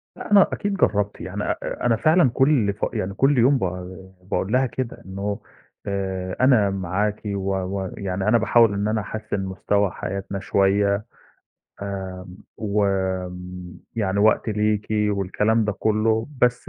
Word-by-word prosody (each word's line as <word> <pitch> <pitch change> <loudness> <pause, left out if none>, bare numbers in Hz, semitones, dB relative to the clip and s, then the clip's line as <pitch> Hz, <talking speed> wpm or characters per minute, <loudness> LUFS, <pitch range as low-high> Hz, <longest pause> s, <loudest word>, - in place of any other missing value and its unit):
لأ، - - -9
أنا 200 -2 +7
أكيد 205 0 -2
جرّبت، 105 - 0
يعني - - -4
آآ - - -3
أنا 115 - +4
فعلًا 155 +4 +4
كل 130 -7 +3
ف 105 - -2
يعني 95 +1 -2
كل 135 +6 +3
يوم 130 +4 +5
ب - - -4 0.7
باقول 95 - -1
لها 130 +1 +4
كده 130 -1 -5
إنه 100 +2 -4 0.5
آآ 95 -2 -3
"أنا 125 -6 +5
معاكِ 100 +2 -1
و 100 -1 -2
ويعني 95 0 -3
أنا 115 +2 +5
باحاول 115 -1 +4
إن 100 +1 -1
أنا 110 0 0
أحسِّن 105 0 -4
مستوى 100 +1 0
حياتنا 100 +1 -4
شوية 100 +2 +2 0.8
آمم، 95 -2 -6 0.2
وم 95 -3 -2 0.2
يعني 100 -3 0
وقتي 110 +1 +3
ليكِ." 105 0 0
والكلام 105 +1 +1
ده 105 - 0
كُلّه، 110 +2 +1 0.2
بس 125 0 +2
100 Hz, 145 wpm, -23 LUFS, 95-110 Hz, 0.8 s, أنا